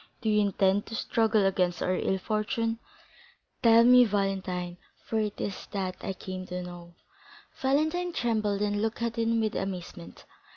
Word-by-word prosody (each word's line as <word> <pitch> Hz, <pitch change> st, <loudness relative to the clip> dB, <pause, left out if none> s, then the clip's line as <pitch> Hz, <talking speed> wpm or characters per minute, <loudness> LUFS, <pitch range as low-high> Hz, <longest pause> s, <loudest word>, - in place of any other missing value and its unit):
Do 220 Hz, -, -1 dB
you 210 Hz, 0 st, +4 dB
intend 200 Hz, 0 st, +1 dB
to 225 Hz, -, -6 dB
struggle 220 Hz, -2 st, +2 dB
against 180 Hz, -2 st, +1 dB
our 185 Hz, -, +1 dB
ill 190 Hz, -, 0 dB
fortune? 225 Hz, +3 st, -1 dB, 0.8 s
Tell 230 Hz, -1 st, +7 dB
me, 250 Hz, +1 st, +8 dB
Valentine 190 Hz, -4 st, -2 dB, 0.3 s
for 225 Hz, -, -1 dB
it 210 Hz, -1 st, -2 dB
is 200 Hz, -, -4 dB
that 190 Hz, -2 st, -2 dB
I 195 Hz, -, -2 dB
came 185 Hz, 0 st, -7 dB
to 180 Hz, 0 st, -4 dB
know." 175 Hz, -1 st, -10 dB, 0.7 s
Valentine 315 Hz, +6 st, +1 dB
trembled, 215 Hz, -7 st, 0 dB
and 205 Hz, 0 st, 0 dB
looked 225 Hz, +1 st, -2 dB
at 230 Hz, 0 st, -2 dB
him 230 Hz, 0 st, +1 dB
with 220 Hz, -1 st, 0 dB
amazement. 180 Hz, -3 st, -6 dB
205 Hz, 160 wpm, -28 LUFS, 185-230 Hz, 0.8 s, me